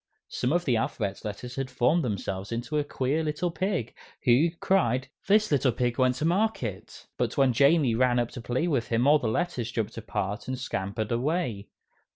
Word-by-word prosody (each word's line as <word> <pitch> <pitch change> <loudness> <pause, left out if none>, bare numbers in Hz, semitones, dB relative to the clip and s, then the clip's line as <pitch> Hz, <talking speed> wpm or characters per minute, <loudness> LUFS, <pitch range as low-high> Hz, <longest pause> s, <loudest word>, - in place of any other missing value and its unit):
Some 125 - -1
of 175 +2 +1
the 125 -4 +2
alphabet 100 -3 -2
letters 110 +4 -6
had 135 -1 -2
formed 130 +7 +2
themselves 100 -2 -3
into 120 +6 -2
a - - +1
queer 145 +2 -1
little 155 +3 -1
pig, 180 - -2 0.3
who 130 +7 +4
cried, 130 -10 +1 0.2
"This 210 0 +4
little 135 -3 +3
pig 120 +1 -1
went 130 -1 +3
to 150 - -2
market," 170 - -1
but - - -1
when 135 -2 +4
Jamie 140 0 +4
ran 125 +1 +2
up 120 -1 0
to 125 - -7
play 125 +8 -1
with 135 -8 0
him 115 +2 +1
all 150 +2 +6
the 120 - -2
letters 120 -3 -1
jumped 115 -1 -3
apart 105 -1 -3
and 130 0 -2
scampered 110 -3 -3
away. 120 - -1
125 Hz, 190 wpm, -27 LUFS, 115-155 Hz, 0.3 s, all